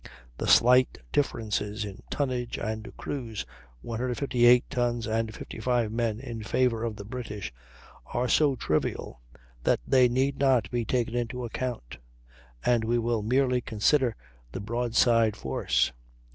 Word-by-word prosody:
The - - -2
slight 125 +2 +5
differences 105 -5 -1
in 100 -1 -9
tonnage 125 -4 -2
and 110 +1 -4
crews 115 -7 -5 0.4
(158 125 +1 +3
tons 120 -1 -1
and 110 0 -1
55 115 +1 -2
men, 115 -1 -1
in 120 -3 -6
favor 115 +1 +1
of 115 -2 -2
the 100 - -9
British) 105 - -6 0.5
are 125 +1 -1
so 145 +1 +3
trivial 75 - -2 0.4
that - - +3
they 130 -2 +5
need 135 +3 0
not 130 -9 +3
be 120 -2 -1
taken 120 -1 0
into 120 +1 -2
account, 120 - -5 0.7
and 120 -2 +3
we 120 +2 +1
will 115 -1 0
merely 125 +3 +2
consider 120 +2 +2 0.4
the - - -5
broadside 115 0 +2
force. 65 - 0
120 Hz, 130 wpm, -27 LUFS, 110-125 Hz, 0.7 s, slight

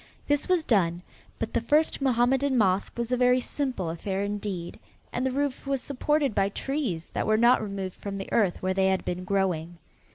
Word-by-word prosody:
This 290 +3 0
was 355 -4 +2
done, 175 -6 +2 0.3
but - - -4
the - - +1
first 295 +6 +2
Mohammedan 265 +1 +2
mosque 195 -1 +1
was 235 0 -2
a 250 - +2
very 250 0 +4
simple 255 - -2
affair 190 +4 -3
indeed 200 -4 -4 0.3
and 245 - -1
the 265 - +1
roof 280 0 -2
was 275 -1 0
supported 285 0 0
by 195 0 +2
trees 230 - -3
that - - -2
were 215 0 +3
not 240 +2 +5
removed 195 -3 -4
from 200 -1 -5
the 195 - -6
earth 195 -6 +1
where 185 0 +1
they 190 0 +2
had 190 0 0
been 180 +1 -3
growing. 180 -3 -1
215 Hz, 195 wpm, -27 LUFS, 190-265 Hz, 0.3 s, not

